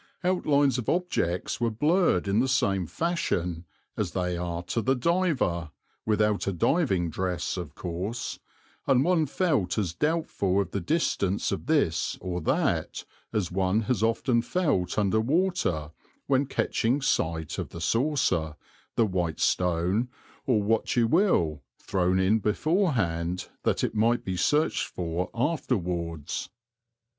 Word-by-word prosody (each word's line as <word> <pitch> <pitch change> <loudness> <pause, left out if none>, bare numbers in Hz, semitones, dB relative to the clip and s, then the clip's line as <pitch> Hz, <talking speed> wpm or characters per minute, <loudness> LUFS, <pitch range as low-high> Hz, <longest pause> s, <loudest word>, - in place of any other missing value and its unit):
Outlines 145 -7 +2
of 115 - -3
objects 145 - -1
were 120 - +2
blurred 150 - +2
in 100 +2 +2
the 130 - +2
same 100 -9 +1
fashion 90 - -1 0.3
as - - -2
they 90 -1 -1
are 85 0 -3
to 115 - -2
the 130 +4 +2
diver 130 - 0 0.4
(without 105 -1 +1
a - - +2
diving 95 - +1
dress 90 0 -2
of 90 -2 -6
course), 95 +7 -4 0.5
and 135 -1 +4
one 165 -2 +2
felt 140 - 0
as 95 -6 0
doubtful 125 - 0
of 100 - -1
the 100 - -2
distance 100 - 0
of 100 +5 -4
this 140 - +1
or 90 -1 -4
that - - 0 0.3
as 105 -6 -1
one 95 +3 +1
has 115 -1 -1
often 115 +1 +2
felt 140 - 0
under 105 +1 +2
water 120 - 0 0.3
when 140 0 +2
catching 125 +2 0
sight 80 - -1
of - - -4
the 85 - -8
saucer, 105 - +1 0.4
the 115 - +4
white 90 -5 -2
stone, 90 +6 +1 0.4
or 110 -6 +3
what 110 +2 +1
you 120 -2 +4
will, 115 - +2 0.2
thrown 95 -1 0
in 100 +4 +3
beforehand 105 - 0
that - - 0
it - - 0
might 115 +2 +2
be 95 - -2
searched 150 - +1
for 85 +1 -3
afterwards. 90 - -2
105 Hz, 140 wpm, -27 LUFS, 90-135 Hz, 0.5 s, and